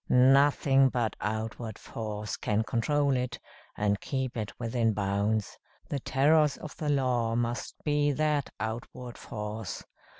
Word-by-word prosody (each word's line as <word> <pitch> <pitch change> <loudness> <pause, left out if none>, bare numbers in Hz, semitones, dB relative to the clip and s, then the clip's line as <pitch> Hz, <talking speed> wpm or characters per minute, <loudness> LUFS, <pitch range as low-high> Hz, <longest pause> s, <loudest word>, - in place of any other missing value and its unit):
Nothing 135 +1 +5
but 120 -5 -1
outward 110 +1 -3
force 105 -2 -5
can 105 +1 0
control 140 +5 +1
it, 125 0 -2 0.4
and 100 -1 +1
keep 130 -2 -2
it 110 -3 -3
within 115 -1 +1
bounds. 100 +1 -1 0.3
The 140 - -1
terrors 145 +2 +3
of 150 - -9
the 150 - -2
law 125 -5 +1
must 120 0 -2
be 145 -1 +2
that 150 -1 +1
outward 120 +2 -5
force. 105 -1 -5
120 Hz, 130 wpm, -29 LUFS, 110-140 Hz, 0.4 s, Nothing